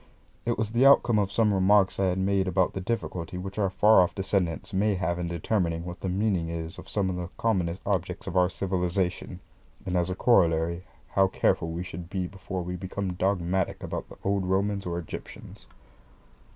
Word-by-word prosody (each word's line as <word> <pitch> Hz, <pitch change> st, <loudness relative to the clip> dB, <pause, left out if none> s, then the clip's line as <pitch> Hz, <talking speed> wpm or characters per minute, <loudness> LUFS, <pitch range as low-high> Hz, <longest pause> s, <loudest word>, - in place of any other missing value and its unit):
It 120 Hz, -, +1 dB
was 110 Hz, -1 st, -1 dB
the 120 Hz, +3 st, +3 dB
outcome 120 Hz, -5 st, +6 dB
of 100 Hz, -1 st, 0 dB
some 110 Hz, -2 st, +3 dB
remarks 95 Hz, 0 st, +3 dB
I 95 Hz, -, +3 dB
had 90 Hz, 0 st, 0 dB
made 95 Hz, 0 st, +1 dB
about 95 Hz, 0 st, +1 dB
the 95 Hz, -, -4 dB
difficulty 90 Hz, -5 st, -3 dB
which 95 Hz, +3 st, -6 dB
our 100 Hz, -2 st, +2 dB
far 105 Hz, +2 st, +5 dB
off 90 Hz, -, 0 dB
descendants 95 Hz, -2 st, -1 dB
may 100 Hz, +2 st, +2 dB
have 90 Hz, -2 st, -1 dB
in 85 Hz, -, -2 dB
determining 85 Hz, -1 st, -1 dB
what 90 Hz, 0 st, -7 dB
the 95 Hz, -, -3 dB
meaning 95 Hz, -3 st, 0 dB
is 85 Hz, 0 st, -5 dB
of -, -, -11 dB
some 100 Hz, -2 st, 0 dB
of 90 Hz, -, -4 dB
the 90 Hz, 0 st, -5 dB
commonest 95 Hz, -5 st, 0 dB
objects 90 Hz, -2 st, -2 dB
of 95 Hz, -, -5 dB
our 90 Hz, -1 st, +4 dB
civilisation, 90 Hz, -1 st, -2 dB, 0.4 s
and 90 Hz, -, -2 dB
as 90 Hz, 0 st, +1 dB
a 90 Hz, -, -2 dB
corollary 85 Hz, -5 st, +2 dB, 0.2 s
how 95 Hz, 0 st, +3 dB
careful 80 Hz, -3 st, +1 dB
we 85 Hz, +2 st, -4 dB
should 90 Hz, -1 st, -8 dB
be 95 Hz, -2 st, -2 dB
before 95 Hz, 0 st, -5 dB
we 90 Hz, +1 st, -4 dB
become 95 Hz, +1 st, -4 dB
dogmatic 95 Hz, 0 st, -1 dB
about -, -, -5 dB
the -, -, -12 dB
old 100 Hz, -1 st, 0 dB
Romans 100 Hz, +1 st, 0 dB
or 85 Hz, 0 st, -2 dB
Egyptians. 85 Hz, -, -8 dB
95 Hz, 195 wpm, -27 LUFS, 90-100 Hz, 0.4 s, outcome